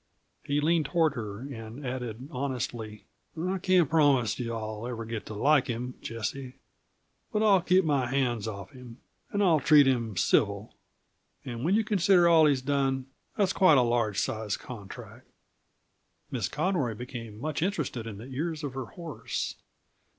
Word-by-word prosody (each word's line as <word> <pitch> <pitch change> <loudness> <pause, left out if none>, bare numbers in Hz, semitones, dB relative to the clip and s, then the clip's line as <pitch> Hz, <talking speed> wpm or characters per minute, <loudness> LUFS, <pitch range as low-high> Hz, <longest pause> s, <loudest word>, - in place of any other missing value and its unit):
He 145 +1 -1
leaned 160 0 +2
toward 165 -3 +2
her 105 -4 -6
and 125 0 -8
added 125 -1 -5
honestly: 125 -6 -4 0.3
"I 185 +3 -1
can't 180 -3 +3
promise 135 -9 +3
you 115 -2 -3
I'll 110 0 -5
ever 115 -2 -5
get 115 -1 -5
to 110 - -6
like 145 +5 +3
him, 125 +1 -3
Jessie; 125 +4 -5 0.8
but 215 -1 +1
I'll 200 -4 +5
keep 185 +1 +3
my 140 -5 +1
hands 120 -4 0
off 100 +3 -7
him, 125 -3 -12 0.3
and 205 0 +1
I'll 165 -5 +4
treat 145 0 +6
him 115 -6 0
civil; 100 +2 +1 0.7
and 120 -1 -5
when 180 +6 +3
you 220 - +3
consider 190 -4 +4
all 160 -2 +6
he's 135 -3 +1
done, 135 -1 0 0.3
that's 195 -2 +2
quite 185 -7 +6
a 125 - +5
large 115 -4 +1
sized 110 -3 -2
contract." 105 -6 -10 1.0
Miss - - -1
Conroy 150 - 0
became 115 -3 -8
much 155 +3 -3
interested 150 - -2
in 105 -3 -7
the 110 - -9
ears 155 +4 -4
of 140 -3 -4
her 130 -1 -4
horse. 165 +3 -5
130 Hz, 160 wpm, -28 LUFS, 115-155 Hz, 1.0 s, treat